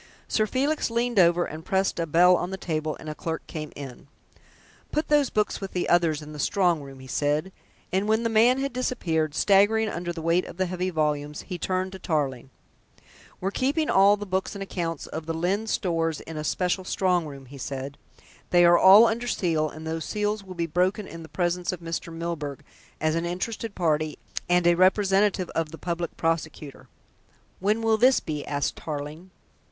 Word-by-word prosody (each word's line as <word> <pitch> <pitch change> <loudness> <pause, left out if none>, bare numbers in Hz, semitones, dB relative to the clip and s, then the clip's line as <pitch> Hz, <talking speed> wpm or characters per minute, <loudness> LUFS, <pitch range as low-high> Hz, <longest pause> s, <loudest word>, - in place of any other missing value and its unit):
Sir 215 -1 +1
Felix 280 +6 0
leaned 235 -1 +1
over 175 0 +4
and 155 +1 -8
pressed 190 0 0
a 165 - -1
bell 180 +4 +6
on 175 0 -2
the 190 - -4
table, 155 -4 -3
and - - -10
a 155 - -3
clerk 160 +1 -5
came 155 -2 -6
in. 135 -2 -9 0.8
"Put 305 - -1
those 295 -3 +4
books 210 -1 -1
with 195 - -6
the 180 - -1
others 165 -3 +2
in 150 0 -10
the 150 - -8
strong 175 -1 +2
room," 135 -1 -11
he - - -11
said, 150 +6 -1 0.4
and 195 +2 +1
when 220 +2 +2
the - - +2
man 230 +3 +4
had 275 -1 -2
disappeared, 160 -12 -1
staggering 210 +4 +4
under 175 -1 -4
the 165 -2 -7
weight 170 +2 +2
of - - -10
the 185 - +1
heavy 185 +1 -2
volumes 150 -2 -1
he 180 - -6
turned 185 +1 -1
to 190 - -9
Tarling. 135 -7 -2 0.9
"We're 190 +2 -2
keeping 285 +7 0
all 200 +2 +6
the 205 - -6
books 190 +1 -2
and 200 - -4
accounts 170 -5 -4
of 160 0 -7
Lyne's 185 +7 -1
Stores 165 -5 0
in 160 - -9
a 150 - -4
special 180 +4 0
strong 180 -3 +1
room," 140 -2 -10
he 135 +2 -12
said. 135 +1 -5 0.5
"They 175 -1 +5
are 175 0 +6
all 200 +4 +9
under 235 +2 -1
seal, 165 -8 0
and 155 +1 -10
those 160 0 -3
seals 210 0 -1
will 185 -1 -10
be 170 -1 -1
broken 180 +5 0
in 165 - -9
the 160 - -11
presence 175 0 -1
of 180 - -6
Mr. 170 0 -5
Milburgh, 165 -4 -5 0.4
as 155 0 +1
an 165 +1 -1
interested 205 +4 -4
party, 155 -3 0 0.3
and 175 0 +3
a 175 - +6
representative 190 +1 +3
of 165 -1 -1
the 165 - -9
Public 170 +1 -4
Prosecutor." 160 -3 -3 0.7
"When 210 +4 +1
will 225 -1 +3
this 255 +4 +5
be?" 150 -2 -4
asked 145 -1 -1
Tarling. 155 +4 -6
175 Hz, 195 wpm, -26 LUFS, 155-195 Hz, 0.9 s, all